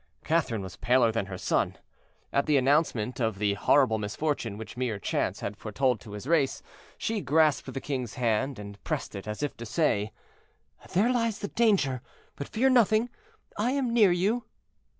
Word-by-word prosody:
Catherine 135 -10 0
was 90 -1 -9
paler 120 +1 +3
than 110 -3 -2
her 95 -2 -6
son. - - 0 0.6
At 140 - +1
the 150 -2 +4
announcement 130 -4 +1
of 110 -4 0
the 100 0 +1
horrible 110 +2 +3
misfortune 115 0 -2
which 110 - -8
mere 120 -4 -2
chance - - -2
had 100 - -4
foretold 120 +3 0
to 105 +1 -11
his 105 +3 -7
race, 145 -3 +1 0.3
she 220 -2 -2
grasped 155 -2 +2
the 135 - -4
king's 130 -6 -4
hand, 125 +2 0
and 100 -1 -10
pressed - - -3
it, 100 +1 -7
as 105 +6 -4
if 145 - -2
to 115 - -7
say— 110 -7 +1 0.8
"There 210 +7 +3
lies 230 -3 0
the 200 - -5
danger; 190 - +2 0.3
but 140 - -6
fear 250 +5 +1
nothing, 235 -2 +4 0.5
I 240 +5 +1
am 265 -4 0
near 215 -6 +6
you." 205 +7 +1
135 Hz, 175 wpm, -28 LUFS, 110-180 Hz, 0.8 s, near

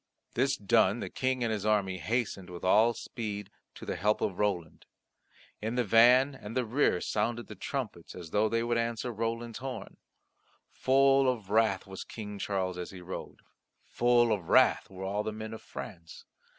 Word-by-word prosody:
This 135 +3 +1
done, 110 0 +3
the - - -5
King 130 -1 0
and 115 -1 0
his 105 -2 -3
army 100 -3 +1
hastened 110 -3 -2
with 90 -1 -9
all 110 +5 +4
speed 105 -4 -6 0.2
to - - -9
the - - -3
help 105 +1 +2
of 95 - -2
Roland. 90 -6 -2 0.7
In 110 +3 -2
the 125 - +2
van 125 +5 +6
and 115 -2 -7
the 125 - +1
rear 115 -5 +2
sounded 120 +3 -1
the - - -9
trumpets 120 - -5
as 85 -3 -9
though 105 +1 +2
they 115 +1 0
would 120 0 +1
answer 115 +1 -2
Roland's 115 +1 -3
horn. 130 0 -7 0.7
Full 135 0 +4
of 110 -6 -3
wrath 110 -3 +2
was 95 -1 -7
King 105 -2 -8
Charles 95 -3 -2
as 90 - -5
he 95 -2 -10
rode; 90 +1 -8 0.4
full 120 -1 +3
of 95 -6 -2
wrath - - +4
were 95 -1 -8
all 100 +2 -1
the 110 - -3
men 110 +1 -7
of 110 - -8
France. 85 -1 -9
110 Hz, 180 wpm, -30 LUFS, 100-120 Hz, 0.7 s, van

